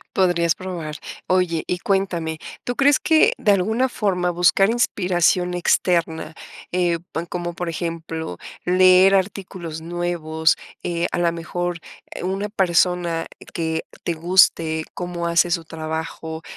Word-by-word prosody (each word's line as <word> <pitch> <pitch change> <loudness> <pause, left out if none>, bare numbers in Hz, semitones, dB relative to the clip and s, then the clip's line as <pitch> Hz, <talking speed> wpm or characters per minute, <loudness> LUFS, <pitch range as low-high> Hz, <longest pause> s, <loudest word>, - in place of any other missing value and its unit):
Podrías 175 -3 +2
probar. 170 -5 -6 0.3
Oye, 180 -3 +1
y 180 - -1
cuéntame. 175 -5 -1 0.3
Tú 245 - -2
crees 280 +1 +4
que 325 +9 +4
de 210 - +3
alguna 220 +7 +1
forma 180 -6 0
buscar 180 +3 +3
inspiración 180 -6 +1
externa, 170 -2 0 0.4
eh, 175 -2 +1
po 165 - -1
como 175 -1 -4
por 175 0 -4
ejemplo 165 - -4 0.3
leer 185 +1 +6
artículos 185 -4 -3
nuevos, 165 -2 0 0.3
eh, 170 0 -1
a - - 0
la 170 -1 +2
mejor 175 +1 -3 0.4
una 195 +3 -2
persona 175 -3 +1 0.3
que 160 -1 -2 0.2
te 170 - -1
guste 165 -2 +3
cómo 175 -1 -4
hace 170 +1 +3
su 170 -1 0
trabajo, 160 0 -5
175 Hz, 125 wpm, -22 LUFS, 165-185 Hz, 0.4 s, leer